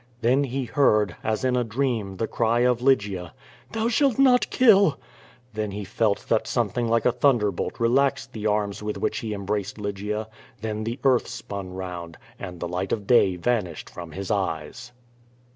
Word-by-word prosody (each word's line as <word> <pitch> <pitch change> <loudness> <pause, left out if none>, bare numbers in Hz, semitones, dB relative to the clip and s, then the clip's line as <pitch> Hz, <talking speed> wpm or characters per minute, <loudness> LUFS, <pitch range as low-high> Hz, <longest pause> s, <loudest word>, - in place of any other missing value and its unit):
Then 130 +5 +3
he 135 0 -3
heard, 110 -5 +2
as 110 +4 -1
in 125 -1 +2
a 125 - +2
dream, 115 -5 -2
the 115 - 0
cry 115 +1 +1
of 125 -1 +2
Lygia 100 -9 +1 0.4
"Thou 225 0 0
shalt 260 +1 +2
not 260 -2 +4
kill!" 200 - +5 0.5
Then 105 -1 -2
he 100 +1 -5
felt 100 +1 0
that 115 - +1
something 120 0 0
like 115 0 +1
a 125 - +5
thunderbolt 115 -8 +1
relaxed 130 +2 +1
the 110 -1 -2
arms 105 -1 -1
with 105 0 -3
which - - -1
he 110 -2 -4
embraced 100 0 -3
Lygia; 105 +1 -3 0.3
then 110 0 -3
the 115 +2 -3
earth 130 -3 +3
spun 95 -2 -7
round, 90 -3 -6 0.2
and 90 -1 -7
the 85 - -3
light 90 +2 -3
of 105 -3 -1
day 95 -5 +4
vanished 90 -4 -2
from 85 -3 -9
his 100 +4 -4
eyes. 100 +4 -3
110 Hz, 175 wpm, -25 LUFS, 100-125 Hz, 0.5 s, kill